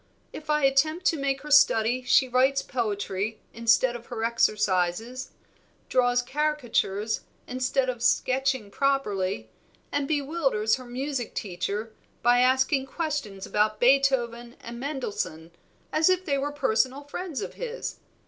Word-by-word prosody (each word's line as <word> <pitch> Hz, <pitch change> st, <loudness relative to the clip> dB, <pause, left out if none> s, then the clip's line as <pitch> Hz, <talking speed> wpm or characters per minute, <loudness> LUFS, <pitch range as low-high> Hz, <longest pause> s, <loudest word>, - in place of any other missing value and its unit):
If 305 Hz, 0 st, -9 dB
I 300 Hz, -1 st, +2 dB
attempt 310 Hz, +6 st, +2 dB
to 320 Hz, -, +2 dB
make 275 Hz, -1 st, -1 dB
her 300 Hz, +1 st, -8 dB
study 255 Hz, -4 st, +5 dB
she 255 Hz, +1 st, +4 dB
writes 260 Hz, +2 st, +2 dB
poetry 210 Hz, -3 st, -2 dB
instead 235 Hz, +2 st, +3 dB
of 240 Hz, 0 st, -9 dB
her 230 Hz, -3 st, -4 dB
exercises, 215 Hz, +2 st, 0 dB, 0.6 s
draws 245 Hz, -1 st, +2 dB
caricatures 245 Hz, -7 st, -1 dB, 0.2 s
instead 255 Hz, +1 st, 0 dB
of 245 Hz, -2 st, -3 dB
sketching 260 Hz, -3 st, +1 dB
properly, 195 Hz, -, -1 dB, 0.4 s
and 285 Hz, -1 st, -1 dB
bewilders 275 Hz, -7 st, +1 dB
her 255 Hz, -, -10 dB
music 255 Hz, 0 st, -4 dB
teacher 210 Hz, +3 st, -3 dB, 0.3 s
by 245 Hz, +1 st, +5 dB
asking 260 Hz, +2 st, +3 dB
questions 280 Hz, -, -3 dB
about 215 Hz, 0 st, +1 dB
Beethoven 245 Hz, -2 st, +2 dB
and 235 Hz, +1 st, -8 dB
Mendelssohn, 210 Hz, -, -4 dB, 0.4 s
as 315 Hz, +3 st, +4 dB
if 370 Hz, 0 st, +1 dB
they 280 Hz, -5 st, 0 dB
were 290 Hz, +2 st, -2 dB
personal 265 Hz, 0 st, 0 dB
friends 310 Hz, +1 st, -5 dB
of -, -, -6 dB
his. -, -, -5 dB
255 Hz, 130 wpm, -26 LUFS, 225-280 Hz, 0.6 s, study